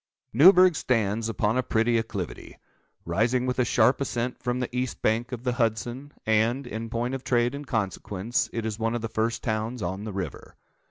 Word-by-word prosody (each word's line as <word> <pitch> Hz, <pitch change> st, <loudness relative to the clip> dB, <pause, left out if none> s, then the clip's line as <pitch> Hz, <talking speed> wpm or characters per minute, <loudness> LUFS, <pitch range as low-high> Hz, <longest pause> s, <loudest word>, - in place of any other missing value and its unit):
Newburgh 180 Hz, -, +7 dB
stands 115 Hz, -4 st, 0 dB
upon 115 Hz, +2 st, 0 dB
a -, -, +4 dB
pretty 115 Hz, -1 st, +1 dB
acclivity, 105 Hz, -6 st, -6 dB, 0.5 s
rising 115 Hz, +9 st, +1 dB
with 125 Hz, 0 st, -1 dB
a -, -, +5 dB
sharp 120 Hz, +4 st, +3 dB
ascent 125 Hz, -2 st, -2 dB
from 125 Hz, 0 st, -1 dB
the 125 Hz, 0 st, -4 dB
east 125 Hz, 0 st, -3 dB
bank 115 Hz, +3 st, +1 dB
of 125 Hz, -1 st, -5 dB
the 125 Hz, -, +1 dB
Hudson; 120 Hz, +3 st, -2 dB
and, 110 Hz, +5 st, +2 dB
in 115 Hz, -1 st, -5 dB
point 120 Hz, +2 st, -2 dB
of 135 Hz, -1 st, -4 dB
trade 120 Hz, 0 st, +1 dB
and 140 Hz, 0 st, -7 dB
consequence, 105 Hz, 0 st, -2 dB
it 115 Hz, -1 st, -3 dB
is 110 Hz, -1 st, -3 dB
one 115 Hz, +1 st, 0 dB
of 120 Hz, -, -2 dB
the 115 Hz, -, -2 dB
first 115 Hz, +1 st, -1 dB
towns 110 Hz, +1 st, -2 dB
on 95 Hz, +3 st, -3 dB
the 110 Hz, -, -5 dB
river. 95 Hz, -1 st, -6 dB
115 Hz, 195 wpm, -26 LUFS, 110-125 Hz, 0.5 s, Newburgh